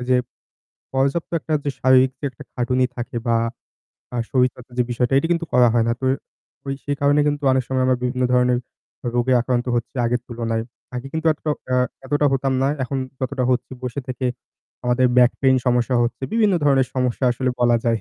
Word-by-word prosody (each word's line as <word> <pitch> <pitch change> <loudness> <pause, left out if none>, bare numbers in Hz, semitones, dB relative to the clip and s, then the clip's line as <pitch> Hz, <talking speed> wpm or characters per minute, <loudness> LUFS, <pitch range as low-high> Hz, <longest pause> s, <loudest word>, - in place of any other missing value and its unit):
এই 125 - -4
যে 130 - +5 0.8
পর্যাপ্ত 140 +6 0
একটা 155 0 -1 0.2
শারীরিক 130 0 +5
যে - - -4
একটা 120 - -12
খাটুনি 125 +1 +1
থাকে 120 0 -4
বা 115 -1 +3 0.8
আর 120 - 0
শরীর 130 -1 +4
চর্চার 125 0 -15
যে - - +5
বিষয়টা 120 +2 0
এটা 165 - 0
কিন্তু 170 0 -1
করা 125 -1 +6
হয় 115 -1 +3
না। 115 - +2
তো 130 - -4 0.6
ওই 135 - -1
সেই 145 -1 -1
কারণে 145 +1 +4
কিন্তু 145 0 -2
অনেক 130 0 +2
সময় 130 -1 +1
আমরা 130 -1 +3
বিভিন্ন 125 0 0
ধরনের 125 0 +3 0.6
রোগে 120 +1 +2
আক্রান্ত 125 0 -1
হচ্ছি 120 - -3
আগের 120 +1 +1
তুলনায়। 115 -1 -2 0.3
আগে 125 +2 -4
কিন্তু 160 0 -2
এতটা 155 0 -4 0.5
এ - - -8 0.3
হতাম 135 0 +1
না। 135 - +3
এখন 135 +1 -2 0.2
যতটা 130 0 -1
হচ্ছি 125 +1 -1
বসে 125 +2 -3
থেকে 130 0 -2 0.6
আমাদের 125 +1 +3
বেক 125 0 +7
পেইন 130 -1 +4
সমস্যা 125 0 +2
হচ্ছে। 120 +3 -3
বিভিন্ন 215 -4 +3
ধরনের 135 -2 +4
সমস্যা 125 0 0
আসলে 130 +1 -1
বলা 120 -1 +4
যায়। 115 -1 +2
125 Hz, 190 wpm, -21 LUFS, 120-135 Hz, 0.8 s, বেক